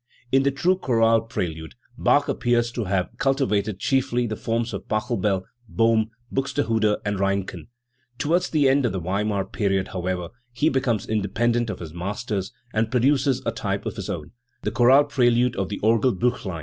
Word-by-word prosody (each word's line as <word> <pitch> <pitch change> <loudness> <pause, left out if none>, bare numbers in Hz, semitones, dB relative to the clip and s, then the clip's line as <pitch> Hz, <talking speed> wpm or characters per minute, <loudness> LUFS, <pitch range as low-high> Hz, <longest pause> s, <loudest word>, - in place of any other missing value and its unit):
In 135 - +5
the 140 - +2
true 175 +7 +1
chorale 115 -6 +3
prelude, 80 -7 -5 0.2
Bach 145 +3 +3
appears 120 -1 +1
to 120 -2 -3
have 95 -1 -1
culti* 135 0 +1
vated 105 -1 0
chiefly 125 -2 +1
the 110 -2 -3
forms 115 +2 -2
of - - -6
Pachelbel, 105 -2 0 0.3
Bohm, 115 -1 +2 0.2
Buxtehude, 115 -6 +1
and 100 -1 -1
Reinken. 100 -4 -2 0.5
Towards 175 +6 +1
the 150 -4 +3
end 135 -1 +3
of 105 - -3
the 95 - -2
Weimar 100 +3 -1
period, 95 -3 -1
how 90 -1 -4
ever, 90 -2 -2 0.2
he 145 +7 +2
becomes 125 -6 0
independent 115 +3 0
of 100 - -4
his 80 -3 -8
masters 100 +2 -3 0.2
and 110 0 +1
produces 130 +1 +2
a - - +1
type 100 -3 -3
of - - -4
his 100 -2 -6
own 80 -7 -5 0.3
the - - -1
chorale 125 +5 +6
prelude 125 -4 +2
of 95 -1 -2
the 100 - -4
Orgelbiich 115 +1 +2
lein. 90 -4 -4
115 Hz, 175 wpm, -24 LUFS, 100-125 Hz, 0.5 s, chorale